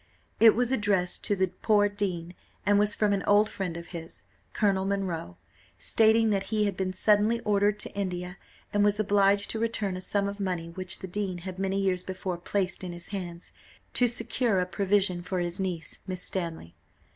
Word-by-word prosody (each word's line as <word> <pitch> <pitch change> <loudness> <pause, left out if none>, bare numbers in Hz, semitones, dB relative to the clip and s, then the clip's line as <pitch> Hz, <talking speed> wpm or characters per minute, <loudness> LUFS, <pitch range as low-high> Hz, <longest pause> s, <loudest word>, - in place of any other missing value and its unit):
It 225 -1 +7
was 245 +1 +1
addressed 200 -7 +1
to 205 - +1
the 190 -1 +2 0.2
poor 205 -2 +4
dean, 185 -4 -3 0.3
and 205 0 +4
was 210 0 +3
from 210 -1 +2
an 195 - 0
old 205 +1 +4
friend 180 -4 -4
of 170 0 -9
his, 165 -1 -9 0.3
Colonel 195 -2 +1
Munro, 190 - -3 0.4
stating 225 0 +4
that 195 -1 0
he 215 -1 +1
had 200 - -1
been 190 -1 -2
suddenly 210 +4 +3
ordered 205 -1 +2
to - - -5
India, 180 -2 -4 0.3
and 205 0 +3
was 205 0 +2
obliged 200 -1 +3
to 220 - -3
return 220 -4 -1
a 185 - -6
sum 200 +1 0
of 200 +1 -5
money 180 -4 -2
which 185 +2 -2
the 190 - -5
dean 190 -1 -3
had 185 -1 -6
many 195 0 0
years 190 -2 +1
before 185 -1 -5
placed 190 +1 -2
in 180 -1 -5
his 175 0 -7
hands, 175 -4 -6 0.4
to 245 - +3
secure 235 -2 +1
a 180 - +1
provision 190 0 +1
for 185 +1 -4
his 175 0 -2
niece, 180 -4 -3
Miss 185 -1 -2
Stanley. 165 - -2
195 Hz, 190 wpm, -28 LUFS, 180-205 Hz, 0.4 s, It